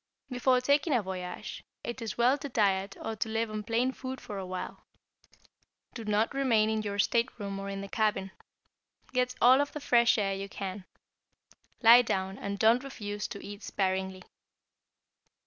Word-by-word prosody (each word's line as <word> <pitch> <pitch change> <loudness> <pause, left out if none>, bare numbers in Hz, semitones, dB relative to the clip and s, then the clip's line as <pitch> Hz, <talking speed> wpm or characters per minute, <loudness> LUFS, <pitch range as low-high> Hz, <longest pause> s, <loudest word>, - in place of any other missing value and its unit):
Before 250 0 +3
taking 285 +3 +2
a 235 - +2
voyage, 180 -1 -6 0.2
it 240 +1 -5
is 225 -3 -4
well 245 +3 +4
to 285 - -5
diet 200 -4 +1
or 225 - -4
to 220 - -2
live 225 0 -1
on 215 0 -3
plain 230 +4 +1
food 260 0 -6
for 205 -2 -6
a 190 - -5
while. 185 0 -6 1.1
Do 230 - -7
not 210 +3 +1
remain 230 -6 +3
in 220 0 0
your 205 -1 -4
stateroom 205 -2 0
or 195 0 -5
in 195 0 -4
the 200 - -6
cabin. 195 -2 0 0.8
Get 250 0 +1
all 255 +3 +7
of 285 - -3
the 300 - -4
fresh 240 -5 +4
air 195 -2 +1
you 195 +1 -5
can. 195 -1 -6 1.0
Lie 235 +2 +10
down 190 -4 -2
and 200 0 -4
don't 230 +5 +4
refuse 210 -6 -5
to 200 -4 -8
eat 205 +1 -8
sparingly. 190 -1 -2
215 Hz, 170 wpm, -30 LUFS, 195-245 Hz, 1.1 s, Lie